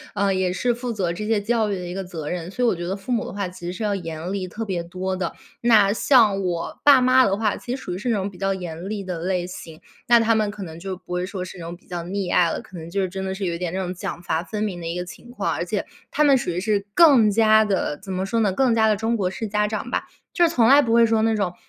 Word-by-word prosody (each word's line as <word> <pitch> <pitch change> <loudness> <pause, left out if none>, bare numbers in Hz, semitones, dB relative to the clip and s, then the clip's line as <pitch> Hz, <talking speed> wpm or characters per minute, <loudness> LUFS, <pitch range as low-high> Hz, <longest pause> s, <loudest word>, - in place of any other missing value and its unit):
呃， 200 -1 +2
也 185 -1 0
是 240 +7 0
负 240 +1 -4
责 185 -6 -1
这 210 +5 -5
些 220 -2 +2
教 220 0 0
育 200 - -1
的 180 - -6
一 175 - -5
个 195 0 -4
责 160 -5 -6
任， 175 -1 -4
所 245 +5 -1
以 - - +4
我 225 - +2
觉 175 0 -5
得 190 - -2
父 200 +6 -7
母 240 0 0
的 - - -6
话 200 -2 -2
其 180 -1 -10
实 175 - -2
是 215 - -5
要 205 -1 +1
严 165 0 -5
厉 190 -2 -3
特 220 +5 -5
别 180 -4 -2
多 185 +2 -4
的。 185 -2 -3 0.3
那 215 -4 +5
像 220 -6 +4
我 175 -2 -3
爸 280 -3 +8
妈 255 0 +5
的 195 +1 +1
话， 215 -2 0
其 250 0 -4
实 - - -6
属 180 - -5
于 - - -4
是 225 +6 -3
那 225 - +2
种 195 0 -2
比 185 - -14
较 195 0 +1
严 175 +1 -6
厉 205 -2 -3
的 180 -3 -4
类 180 +1 -1
型， 165 -3 -9 0.3
那 235 0 +6
他 230 0 +3
们 215 -2 +1
可 205 -1 -7
能 165 -2 -9
就 190 +1 -5
不 180 0 -9
会 180 0 -1
说 185 -1 -5
是 185 - -10
那 - - -7
种 170 - -6
比 - - -29
较 175 -1 -4
溺 185 +1 -3
爱 170 -2 +4
了， - - -3
可 190 - -15
能 165 +1 -8
就 195 +2 -1
是 185 - -1
真 190 +1 -5
的 190 0 -3
是 195 0 -3
有 175 - -1
一 - - -3
点 175 -2 -2
那 190 - -3
种 185 -1 -3
奖 175 -1 -6
罚 165 0 -1
分 210 +5 -4
明 185 -5 -3
的 165 - -5
一 170 - -3
个 180 - -4
情 210 +6 -12
况， 245 - -2
而 - - -2
且 - - -2 0.2
他 300 - +1
们 285 -2 +6
属 240 - -3
于 175 +1 -1
是 205 0 0
更 275 -10 +7
加 220 +1 +5
地， 195 -8 -1
怎 195 -1 -8
么 185 +1 -2
说 230 +4 -1
呢， 210 -3 +2
更 255 +4 +2
加 220 -1 +3
地 215 - +3
中 225 +3 -1
国 190 -4 0
式 220 +4 -5
家 210 0 +1
长 220 +4 -4
吧， - - -1 0.3
就 345 -1 +4
是 - - -1
从 230 -6 +4
来 280 +3 +7
不 230 - -1
会 235 0 +6
说 225 -1 +2
那 225 0 +2
种， 195 -4 -1
195 Hz, 345 characters per minute, -23 LUFS, 180-225 Hz, 0.3 s, 爸